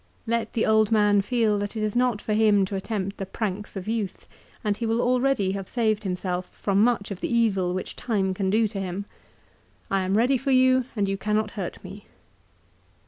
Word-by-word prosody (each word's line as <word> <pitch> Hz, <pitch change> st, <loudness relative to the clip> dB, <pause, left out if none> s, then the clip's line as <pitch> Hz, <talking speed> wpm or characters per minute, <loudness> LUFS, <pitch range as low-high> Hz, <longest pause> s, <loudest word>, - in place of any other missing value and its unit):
Let 230 Hz, 0 st, -1 dB
the 225 Hz, -, +1 dB
old 220 Hz, -1 st, +3 dB
man 210 Hz, -2 st, +4 dB
feel 215 Hz, -1 st, +1 dB
that 205 Hz, +2 st, -4 dB
it 215 Hz, -, -1 dB
is 215 Hz, 0 st, -1 dB
not 245 Hz, -3 st, +1 dB
for 215 Hz, -, -1 dB
him 210 Hz, -2 st, +4 dB
to 195 Hz, -, -5 dB
attempt 195 Hz, 0 st, -3 dB
the 195 Hz, -, -4 dB
pranks 205 Hz, 0 st, -4 dB
of 190 Hz, 0 st, -6 dB
youth, 220 Hz, -4 st, -3 dB, 0.4 s
and 210 Hz, -2 st, +1 dB
he 230 Hz, +2 st, -3 dB
will 225 Hz, +1 st, +1 dB
already 250 Hz, -5 st, +2 dB
have 195 Hz, -1 st, -4 dB
saved 220 Hz, -3 st, 0 dB
himself 180 Hz, -1 st, -2 dB
from 200 Hz, 0 st, +1 dB
much 230 Hz, -4 st, +1 dB
of 190 Hz, -, -5 dB
the -, -, -3 dB
evil 195 Hz, -6 st, +2 dB
which 185 Hz, -, -5 dB
Time 195 Hz, -5 st, -1 dB
can 190 Hz, 0 st, -1 dB
do 220 Hz, +3 st, +3 dB
to 195 Hz, -, -5 dB
him. 190 Hz, +1 st, -4 dB, 0.9 s
I 195 Hz, -1 st, +2 dB
am 190 Hz, +2 st, +1 dB
ready 250 Hz, +3 st, +3 dB
for 275 Hz, -, -3 dB
you, 255 Hz, -1 st, +4 dB
and 205 Hz, -2 st, 0 dB
you 195 Hz, 0 st, -1 dB
cannot 210 Hz, +1 st, 0 dB
hurt 190 Hz, -5 st, -6 dB
me. 195 Hz, +2 st, -10 dB
210 Hz, 205 wpm, -25 LUFS, 195-230 Hz, 0.9 s, man